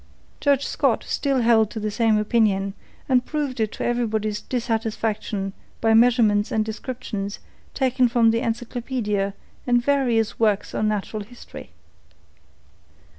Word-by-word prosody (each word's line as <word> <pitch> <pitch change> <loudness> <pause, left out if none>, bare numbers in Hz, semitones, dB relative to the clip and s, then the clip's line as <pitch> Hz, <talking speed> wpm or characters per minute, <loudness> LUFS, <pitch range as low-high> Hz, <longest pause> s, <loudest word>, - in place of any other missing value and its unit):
Judge 280 -1 +2
Scott - - +1
still 275 -3 0
held 225 -2 +4
to 220 - -6
the 215 0 -2
same 225 0 +2
opinion, 210 -3 +1 0.3
and 255 -2 +3
proved 285 -3 -3
it 220 -1 0
to - - -4
everybody's 220 -3 -1
dissatisfaction 220 -4 -2 0.3
by 225 0 +3
measurements 225 -3 +4
and 215 -1 +1
descriptions 220 -3 -5 0.4
taken 255 -1 +2
from 230 -1 +4
the 230 - +1
encyclopaedia 230 -4 -2 0.3
and 245 -1 +2
various 250 -6 +1
works 210 -3 +1
on 215 - 0
natural 215 0 -2
history. 240 +4 -11
225 Hz, 125 wpm, -23 LUFS, 210-245 Hz, 0.4 s, held